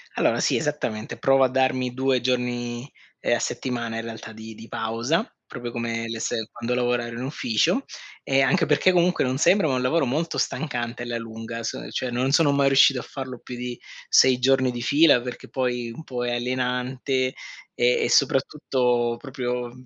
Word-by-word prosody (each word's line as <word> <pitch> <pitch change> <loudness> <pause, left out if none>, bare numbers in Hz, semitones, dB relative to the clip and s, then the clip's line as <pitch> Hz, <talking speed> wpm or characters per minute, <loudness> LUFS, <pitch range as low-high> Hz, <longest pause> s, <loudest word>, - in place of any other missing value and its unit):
Allora - - +2
sì, - - +2
esattamente. 135 -8 -3
Provo 135 0 +4
a 130 - +4
darmi 130 -1 +1
2 130 -1 +1
giorni, 120 0 -2 0.3
ehm, - - +1
a - - -2
settimana, 120 -3 -3
in 115 - -3
realtà 115 -1 -8
di 110 0 -10
di 115 +1 -12
pausa, 115 - -1 0.2
proprio 120 -2 -6
come 115 -1 -3
le 115 0 -5
se 110 0 -2
quando 120 +1 -3
lavorare 120 -1 0
in 120 - -5
ufficio 150 - 0 0.4
e 135 0 +2
anche 135 +4 +3
perché 150 +5 +3
comunque 180 0 +2
non 130 +1 -1
sembra, 175 +3 +4
ma 135 - 0
è - - +1
un 125 - -1
lavoro 140 +4 +2
molto 155 +7 -2
stancante 120 -5 -2
alla 120 -1 -3
lunga, 115 0 -7
son 115 - -5
cioè, 125 - -2
non 130 +3 0
sono 150 -1 +4
mai 140 -1 +3
riuscito 135 -1 +5
a - - -6
farlo 130 -3 -7
più 125 - -8
di 120 0 -5 0.3
6 130 -1 +5
giorni 130 0 +3
di 120 -1 -5
fila 145 +1 +5
perché 125 0 -8
poi 125 -2 -2
un 160 - -9
po' 125 -4 -4
è 120 - -1
alienante 125 +1 -1 0.4
e 485 0 +3
e - - 0
soprattutto 125 -5 +2
proprio, 125 -2 -3
mhmm 125 +1 -15
125 Hz, 190 wpm, -24 LUFS, 120-135 Hz, 0.4 s, riuscito